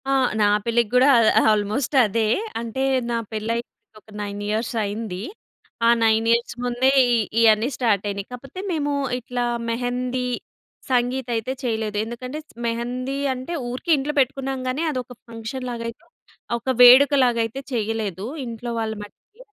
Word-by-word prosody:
ఆ! - - +3 0.3
నా - - +5 0.2
పెళ్ళికి 235 -1 +1
కూడా 255 +2 +6 0.3
ఆహ్, - - +3
ఆల్మోస్ట్ 215 +7 -1
అదే. 220 +1 0 0.3
అంటే 235 +3 -3 0.3
నా 235 - 0
పెళ్ళై, 220 +1 -2 0.4
ఒక 210 - -35
9 205 0 -5
ఇయర్స్ 220 +3 -1
అయింది. 205 -2 -4 0.6
ఆ - - +6
9 220 0 +3
ఇయర్స్ 235 +1 +1
ముందే 245 +2 +2 0.2
ఇ - - +4 0.3
ఇయన్నీ 220 +2 +4
స్టార్ట్ 220 -6 +1
అయినాయి. 200 0 -5
కాపోతే 270 +7 -9
మేము 295 -3 -1 0.3
ఇట్లా 245 0 -3 0.2
మెహందీ, 250 +1 -2 0.6
సంగీత్ 250 0 0
అయితే 225 +3 -2
చేయలేదు. 220 -3 -2
ఎందుకంటే 250 +5 -6 0.3
మెహందీ 250 +3 -3 0.2
అంటే 260 +6 -6 0.2
ఊరికే 255 +8 -3
ఇంట్లో 285 +2 -2
పెట్టుకున్నాం 270 0 0
గానీ, 275 +6 -1
అదొక 255 -3 -5 0.2
ఫంక్షన్‌ 230 +3 -6
లాగా 230 -1 -5
అయితే 230 - -12 0.6
ఒక 235 - -22
వేడుకలాగైతే 250 -2 +6
చేయలేదు. 215 -4 -2 0.2
ఇంట్లో 235 +1 -5
వాళ్ళ 220 -1 -2
మట్టికి. 415 - -17
240 Hz, 140 wpm, -23 LUFS, 220-255 Hz, 0.6 s, కూడా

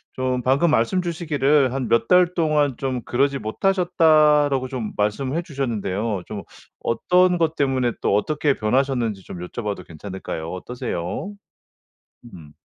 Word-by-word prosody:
좀 130 -1 -1
방금 140 +6 +3
말씀 155 +8 +2
주시기를 150 -6 +1
"한 130 -2 -2
몇 115 0 +2
달 180 -1 +4
동안 150 -5 +1
좀 130 -2 -2
그러지 140 +2 0
못하셨다."라고 155 - +3
좀 120 -5 -4
말씀해 130 +9 -1
주셨는데요. 110 - -2
좀 105 -2 -6 0.4
어떤 180 +9 +3
것 165 -2 0
때문에 130 -4 +1
또 - - +2
어떻게 145 +5 +1
변하셨는지 115 -3 0
좀 90 - -9
여쭤 120 - -7
봐도 100 -3 -4
괜찮을까요? 85 -1 -7
어떠세요? 120 - -5 1.0
음. 75 -4 -13
130 Hz, 305 characters per minute, -22 LUFS, 110-155 Hz, 1.0 s, 달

